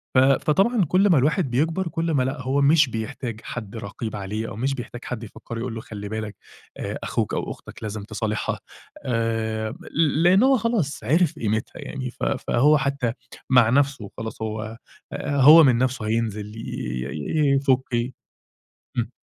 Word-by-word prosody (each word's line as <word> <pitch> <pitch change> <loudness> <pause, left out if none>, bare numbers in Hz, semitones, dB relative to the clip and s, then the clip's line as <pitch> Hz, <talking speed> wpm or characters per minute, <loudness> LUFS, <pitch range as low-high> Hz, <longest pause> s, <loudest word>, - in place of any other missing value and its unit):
ف - - +7
فطبعًا 175 - +3
كلّ 185 +6 +3
ما 170 - +5
الواحد 150 +2 +2
بيكبَر 160 +8 0
كلّ 165 0 -1
ما 140 -4 +2
لأ، 135 +2 -3
هو 135 +3 +1
مش 150 0 +5
بيحتاج 115 0 -5
حد 110 -3 -6
رقيب 110 +1 -5
عليه، 105 +2 -4
أو - - -7
مش 130 +5 -1
بيحتاج 120 -1 -8
حد 120 -2 -5
يفكّره 115 +1 -8
يقول 120 0 -4
له 115 - -5
خلّي 105 -2 -7
بالك 110 -1 -4 0.4
آآ، - - -4
أخوك - - -1
أو - - -2
أختك - - -11
لازم 105 -1 -4
تصالحها 110 0 -2 0.5
آآ، 115 -2 -1
م - - -9 0.2
ل 155 0 +2
لإن 185 +5 +6
هو 265 0 +5
خلاص 220 - -1
عرِف 160 +6 +2
قيمتها 110 0 -2
يعني، 130 -2 -5
ف - - -10
فهو 140 +3 +3
حتى 135 -4 -1 0.4
مع 125 -3 +6
نفْسه 135 -3 +2
وخلاص، 110 +3 -7
هو 110 0 -4 0.4
آآ، 140 -1 -1
هو 155 +5 +10
من 130 -5 +5
نفْسه 125 -2 0
هينزِل 110 -2 -1
ي - - -6 0.5
ي 140 - +1
يفُكِ 130 -2 +1
ي 120 +2 0 0.9
امم. 115 -1 0
125 Hz, 175 wpm, -24 LUFS, 110-145 Hz, 0.9 s, هو